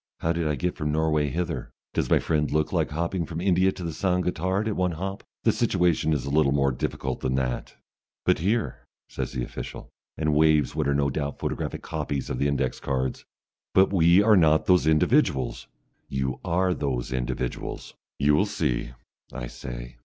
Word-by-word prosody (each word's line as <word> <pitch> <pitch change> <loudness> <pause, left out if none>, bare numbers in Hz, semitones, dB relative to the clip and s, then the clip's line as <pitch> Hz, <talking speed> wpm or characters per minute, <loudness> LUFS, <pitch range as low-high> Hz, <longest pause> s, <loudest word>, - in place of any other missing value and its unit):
How 80 - +1
did 85 -2 -1
I 75 - +1
get 90 +7 -2
from 75 0 -2
Norway 75 -1 +1
hither? 85 +5 -3 0.2
Does - - 0
my - - +5
friend 75 -2 0
look 75 +1 0
like - - +1
hopping 85 +3 -1
from 80 +1 -5
India 95 +1 +3
to 90 - -8
the 85 -2 -3
Saint 90 0 0
Gotthard 95 +4 0
at 105 - -1
one 90 -2 0
hop? 95 +4 -5 0.2
The - - +5
situation 85 -2 +1
is 70 -5 0
a 70 - -3
little 75 -2 +3
more 70 -1 +2
difficult 60 - -3
than 65 0 -1
that 65 -2 -2 0.3
" - - -68
"But - - +3
here!" 105 +7 -1 0.2
says - - -4
the 65 -2 -2
official, - - -7 0.3
and 75 -1 +1
waves 75 -1 +4
what - - -1
are 70 - +2
no 70 -1 +1
doubt 70 0 -3
photographic - - -3
copies 75 -3 -3
of 60 - -2
the 70 - +2
index 70 -2 -1
cards. 65 -1 -2 0.5
"But 95 +1 +5
we 85 +2 +5
are 110 0 +6
not 80 -4 +4
those 90 -4 +4
individuals!" 80 - +2 0.4
"You 65 -1 -2
are 90 +2 +1
those 65 -5 -2
individuals." 60 0 -3 0.2
"You 75 +1 +3
will 85 +8 +3
see," 60 -10 -1 0.4
I - - -5
say. - - -8
75 Hz, 190 wpm, -26 LUFS, 70-90 Hz, 0.5 s, are